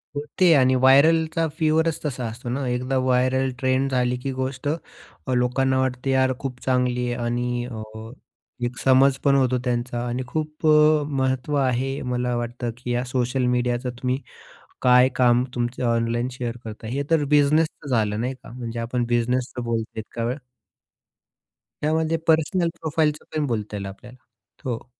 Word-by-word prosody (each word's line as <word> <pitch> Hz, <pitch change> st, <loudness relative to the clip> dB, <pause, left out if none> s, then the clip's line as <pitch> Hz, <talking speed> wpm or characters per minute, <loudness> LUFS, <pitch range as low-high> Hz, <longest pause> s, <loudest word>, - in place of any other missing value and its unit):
होते. 155 Hz, +4 st, +2 dB
आणि 130 Hz, -2 st, +4 dB
व्हायरलचा 160 Hz, +5 st, +4 dB
फिवरच 160 Hz, 0 st, +2 dB
तसा 125 Hz, -4 st, -3 dB
असतो 115 Hz, +2 st, -6 dB
ना, 130 Hz, +1 st, -2 dB
एकदा 125 Hz, +2 st, -1 dB
व्हायरल 130 Hz, +1 st, +2 dB
ट्रेंड 130 Hz, +1 st, +1 dB
झाली 125 Hz, -1 st, +1 dB
की 135 Hz, -, -2 dB
गोष्ट 130 Hz, +1 st, -4 dB
अ, 145 Hz, -, -6 dB
लोकांना 130 Hz, +2 st, +1 dB
वाटते 130 Hz, 0 st, -1 dB
"यार, 130 Hz, 0 st, +3 dB
खूप 125 Hz, -2 st, -5 dB
चांगली 125 Hz, -1 st, +1 dB
आहे." 120 Hz, 0 st, -4 dB
आणि 120 Hz, 0 st, -1 dB
अ, 115 Hz, -3 st, -6 dB, 0.8 s
एक 120 Hz, +1 st, -4 dB
समज 135 Hz, +1 st, +5 dB
पण 140 Hz, -1 st, +4 dB
होतो 130 Hz, -2 st, +2 dB
त्यांचा. 120 Hz, -1 st, -2 dB
आणि 125 Hz, +2 st, -2 dB
खूप 155 Hz, +2 st, -3 dB
अ, 150 Hz, 0 st, +5 dB
महत्त्व 130 Hz, 0 st, -1 dB
आहे 135 Hz, +1 st, 0 dB
मला 125 Hz, 0 st, -1 dB
वाटतं 120 Hz, 0 st, -3 dB
की 125 Hz, 0 st, -5 dB
या 120 Hz, +1 st, 0 dB
सोशल 125 Hz, 0 st, 0 dB
मीडियाचा 125 Hz, +1 st, -1 dB
तुम्ही 130 Hz, 0 st, 0 dB, 0.6 s
काय 125 Hz, 0 st, +6 dB
काम 125 Hz, -1 st, +4 dB
तुमचं 120 Hz, +1 st, -2 dB
ऑनलाईन 115 Hz, +1 st, 0 dB
शेअर 120 Hz, -1 st, -4 dB
करता. 110 Hz, 0 st, -8 dB
हे 135 Hz, +5 st, -2 dB
तर 160 Hz, -3 st, +4 dB
बिझनेसचं 150 Hz, +1 st, +2 dB
झालं 110 Hz, -3 st, +1 dB
नाही 125 Hz, +2 st, -1 dB
का. 130 Hz, -, -14 dB
म्हणजे 120 Hz, -1 st, -6 dB
आपण 120 Hz, +1 st, -1 dB
बिझनेसचं 125 Hz, +1 st, -1 dB
बोलतोय 115 Hz, -1 st, -3 dB
इतका 115 Hz, +1 st, -5 dB
वेळ. 125 Hz, +3 st, -2 dB, 1.4 s
त्यामध्ये 160 Hz, +2 st, +1 dB
पर्सनल 165 Hz, +2 st, +2 dB
प्रोफाइलच 155 Hz, -1 st, 0 dB, 0.2 s
पण 150 Hz, -1 st, +1 dB
बोलता 110 Hz, -3 st, -3 dB
येईल 100 Hz, -1 st, -4 dB
आपल्याला. 120 Hz, +6 st, -10 dB, 0.5 s
हो. 120 Hz, -3 st, -3 dB
130 Hz, 155 wpm, -23 LUFS, 120-140 Hz, 1.4 s, काय